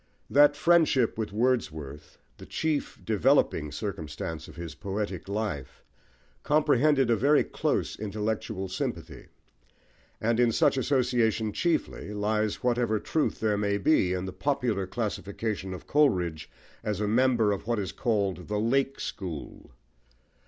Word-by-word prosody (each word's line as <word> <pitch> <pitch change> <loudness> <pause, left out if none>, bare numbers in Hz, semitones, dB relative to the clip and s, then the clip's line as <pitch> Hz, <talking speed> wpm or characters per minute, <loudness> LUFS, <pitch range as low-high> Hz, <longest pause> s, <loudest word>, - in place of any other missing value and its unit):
That 145 +1 +6
friendship 155 -7 +3
with 110 -2 -3
Wordsworth, 80 - -2 0.2
the - - -12
chief 155 -2 -2
"developing" 110 - +2
circumstance 80 -5 -5
of 75 - -12
his 85 -3 -7
poetic 100 -2 -4
life, 100 -11 -4 0.6
comprehended 145 -3 +3
a - - +5
very 140 +7 +4
close - - -2
intellectual 105 -1 -3
sympathy; 95 - -5 0.9
and 115 +1 +1
in 120 -1 +4
such 115 - +3
association 120 -5 +1
chiefly, 160 - -1
lies 105 +1 -1
whatever 120 -3 +1
truth 155 +7 -1
there 105 -2 +1
may 100 -1 +1
be 100 -5 +3
in 90 0 -2
the 95 - -6
popular 125 -9 -1
classification 100 -2 -3
of 90 - -7
Coleridge 90 - +1 0.3
as 105 -2 -2
a 105 - 0
member 115 -1 +3
of 100 +1 -4
what 120 -1 +1
is 95 -5 -2
called 100 -7 -1
the 105 0 -1
"Lake 135 +5 +1
School." 85 -7 -6
110 Hz, 130 wpm, -28 LUFS, 95-125 Hz, 0.9 s, That